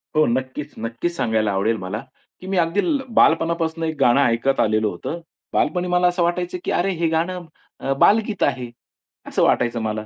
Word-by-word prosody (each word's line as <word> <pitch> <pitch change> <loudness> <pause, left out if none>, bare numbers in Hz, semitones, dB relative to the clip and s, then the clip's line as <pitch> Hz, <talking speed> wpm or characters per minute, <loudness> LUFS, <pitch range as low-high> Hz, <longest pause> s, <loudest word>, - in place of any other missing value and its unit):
हो, 155 0 +5
नक्कीच, 130 +4 -3
नक्कीच 115 +10 -3
सांगायला 110 -5 0
आवडेल 100 +4 0
मला, 95 +5 -5 0.4
की 185 - -10
मी 190 0 -1
अगदी 170 +3 +1
ल 295 -5 0 0.2
बालपणापासून 165 0 +2
एक 160 -1 -1
गाणं 120 +3 +4
ऐकत 125 +2 +1
आलेलं 110 0 +2
होतं. 105 - -5 0.3
बालपणी 180 -1 +1
मला 180 0 +3
असं 175 0 +1
वाटायचं, 175 +1 -1
की - - -2
"अरे, 190 +3 +1
हे 170 -2 0
गाणं 175 +2 -1 0.3
अ, 135 - -1
बालगीत 215 -1 +3
आहे." 125 -2 -1 0.6
असं - - 0
वाटायचं 120 -1 +2
मला. 110 0 -3
160 Hz, 180 wpm, -21 LUFS, 115-175 Hz, 0.6 s, हो